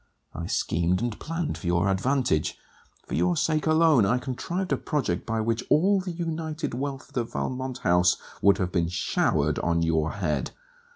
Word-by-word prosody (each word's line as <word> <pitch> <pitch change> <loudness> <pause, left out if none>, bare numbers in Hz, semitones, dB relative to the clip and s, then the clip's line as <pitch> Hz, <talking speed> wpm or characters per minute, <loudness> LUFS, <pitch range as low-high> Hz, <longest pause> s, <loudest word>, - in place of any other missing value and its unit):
I 85 +1 -5
schemed 85 +3 0
and 120 -2 -3
planned 165 0 -3
for 90 - -6
your 85 +2 +2
advantage. 95 - +1 0.5
For - - -8
your 85 +3 +2
sake 155 -1 +1
alone, 155 -6 +5
I 110 +6 +2
contrived 170 +9 -3
a - - +2
project 130 - -2
by 115 0 0
which 115 +1 -1
all 190 +5 +4
the 185 - -5
united 160 -3 -3
wealth 135 +1 -4
of - - -23
the 120 - 0
Valmont 130 +2 -4
house 90 0 +4 0.2
would 100 0 +5
have 90 -3 -1
been 85 -3 +1
showered 90 - +1
on 85 -1 +1
your 80 -1 +1
head. 90 -7 -1
120 Hz, 175 wpm, -26 LUFS, -, 0.5 s, alone